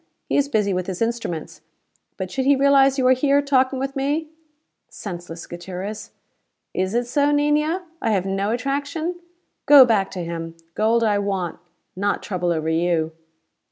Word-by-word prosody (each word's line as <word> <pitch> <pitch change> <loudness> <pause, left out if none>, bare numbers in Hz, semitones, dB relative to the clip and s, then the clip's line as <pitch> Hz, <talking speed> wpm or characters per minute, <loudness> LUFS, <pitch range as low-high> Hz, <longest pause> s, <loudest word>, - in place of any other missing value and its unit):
He - - -2
is 285 0 +2
busy 210 -6 +1
with 180 0 -2
his 185 -2 -4
instruments, 225 -10 -3 0.6
but 185 -2 -5
should 265 +5 -1
he 280 +1 +5
realize 275 0 +4
you 260 - +1
are 255 - +6
here, 275 +2 +3
talking 265 -2 +2
with 270 +2 -3
me 290 +3 -1 0.3
" 315 - -51 0.2
"Senseless, 175 -3 -8
Gutierrez!" 185 +4 -7 0.6
"Is 185 +3 -1
it 240 0 +1
so, 285 +4 +1
Niña? 300 +4 +1 0.2
I - - 0
have 195 -4 +1
no 195 +1 -1
attraction? 285 +8 -2 0.5
Go 285 -2 +10
back 210 -5 +1
to 180 -2 -5
him. 165 -1 -5 0.2
Gold 225 +4 +2
I 210 -2 +2
want, 195 -4 -2 0.4
not 200 +2 -1
trouble 180 -3 -1
over 160 -1 -1
you!" 165 0 +1
225 Hz, 165 wpm, -22 LUFS, 180-275 Hz, 0.6 s, Go